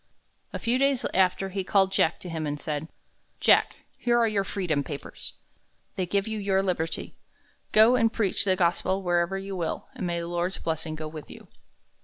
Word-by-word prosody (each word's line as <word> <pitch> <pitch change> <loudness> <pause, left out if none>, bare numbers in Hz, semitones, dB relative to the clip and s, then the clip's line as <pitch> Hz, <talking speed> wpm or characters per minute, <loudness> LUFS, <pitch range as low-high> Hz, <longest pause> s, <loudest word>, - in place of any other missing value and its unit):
A - - -3
few 240 +2 0
days 275 -2 +2
after, 190 +1 +2
he 190 0 -3
called 195 0 +3
Jack 170 -3 +2
to 180 - -7
him 160 -2 -3
and 145 0 -3
said: 150 +1 -3 0.5
"Jack, - - +4 0.2
here 240 -1 +2
are 235 -1 +4
your 205 -2 +1
freedom 175 -7 -1
papers. 145 0 -8 0.6
They 185 -2 -1
give 200 +3 0
you 220 -1 -3
your 195 -1 +1
liberty. 170 -4 -2 0.6
Go 220 +3 +7
and 230 -2 +3
preach 210 -6 +1
the 190 -2 +3
gospel 185 +2 +1
wherever 175 +1 +1
you 195 0 -5
will, 170 -3 -3
and 225 -9 -4
may 170 0 -1
the 170 - -4
Lord's 175 +2 -2
blessing 160 -1 -3
go 155 0 -5
with 155 -1 -9
you." - - -13
185 Hz, 190 wpm, -27 LUFS, 170-200 Hz, 0.6 s, Go